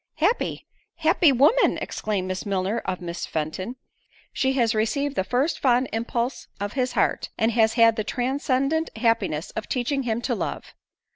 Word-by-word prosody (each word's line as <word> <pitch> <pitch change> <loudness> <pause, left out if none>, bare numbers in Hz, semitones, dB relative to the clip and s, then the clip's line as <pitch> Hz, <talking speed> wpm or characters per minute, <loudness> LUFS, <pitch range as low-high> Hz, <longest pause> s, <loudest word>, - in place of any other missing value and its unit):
"Happy! 375 +10 0 0.3
happy 325 -1 +4
woman!" 290 - +4
exclaimed 200 -4 -3
Miss 185 0 -3
Milner 200 +3 -1
of 185 -1 -3
Miss 175 0 -5
Fenton; 165 +9 -3 0.6
"she 265 0 +1
has 235 -4 +2
received 270 +7 0
the - - +1
first 250 - 0
fond 255 -1 +3
impulse 235 +2 -2
of 205 +1 -3
his 255 -2 -1
heart, - - +1
and 225 0 +2
has 225 -1 +3
had 230 -2 +5
the 215 - 0
transcendent 275 +6 0
happiness 220 -9 0
of 220 - -6
teaching 275 +2 0
him 230 -3 -1
to - - 0
love!" - - -4
235 Hz, 160 wpm, -24 LUFS, 210-270 Hz, 0.6 s, had